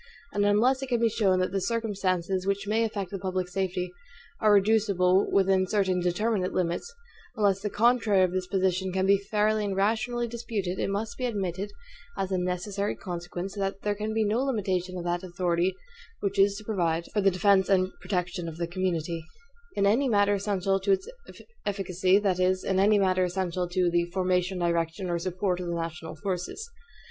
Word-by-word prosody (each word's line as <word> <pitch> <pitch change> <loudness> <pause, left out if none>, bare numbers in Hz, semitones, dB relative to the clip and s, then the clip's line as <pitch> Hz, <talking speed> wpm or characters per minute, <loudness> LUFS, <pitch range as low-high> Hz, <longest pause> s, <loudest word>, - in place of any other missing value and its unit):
And 205 - +1
unless 245 +6 +3
it 270 - -4
can 240 -2 +1
be 230 0 +3
shown 205 -4 +2
that 185 - 0
the 195 0 -1
circumstances 195 -4 -1
which 200 0 0
may 220 +2 +2
affect 200 -5 -3
the 195 - -4
public 185 -1 -2
safety 180 -1 -2 0.5
are 215 -2 +4
reducible 200 -2 +3
within 190 -1 +3
certain 190 -2 +1
determinate 185 +2 0
limits; 175 - -1 0.4
unless 200 -3 +2
the 210 - -2
contrary 220 -3 +3
of 185 - +2
this 185 0 -2
position 190 0 0
can 190 +1 0
be 200 0 +4
fairly 210 +1 +1
and 200 -2 -2
rationally 230 +4 0
disputed, 220 -6 -3
it - - 0
must 205 +5 -3
be 255 - -1
admitted, 195 -3 -3 0.5
as 195 0 -2
a 185 - +1
necessary 185 +3 -2
consequence, 175 +1 -6
that 195 -1 -3
there 205 - +1
can 215 +1 -3
be 220 0 +1
no 215 +4 +1
limitation 185 -8 -1
of 175 - -4
that 175 0 -1
authority 175 0 0 0.5
which 200 0 -1
is 200 +1 +5
to 215 - -8
provide 170 -6 0
for 210 - +2
the 195 - +5
defense 190 0 +3
and 185 -1 +3
protection 180 -2 -2
of 160 - -9
the 170 - -1
community, 170 -2 -2 0.5
in 200 - +2
any 245 +7 +3
matter 205 -2 +3
essential 195 -1 0
to 390 - +2
its 385 +2 -2 0.6
efficacy 190 -1 +2
that 195 -3 +1
is, 185 0 +2
in 190 -1 +1
any 205 +2 +5
matter 185 -2 +2
essential 180 -1 -2
to 180 -1 +1
the 170 0 +2
FORMATION, 180 +1 0
DIRECTION, 170 +1 -1
or 170 - 0
SUPPORT 180 +1 -1
of 180 - -4
the 170 - -2
NATIONAL 165 -1 -5
FORCES. 195 - -4
190 Hz, 190 wpm, -27 LUFS, 180-205 Hz, 0.6 s, is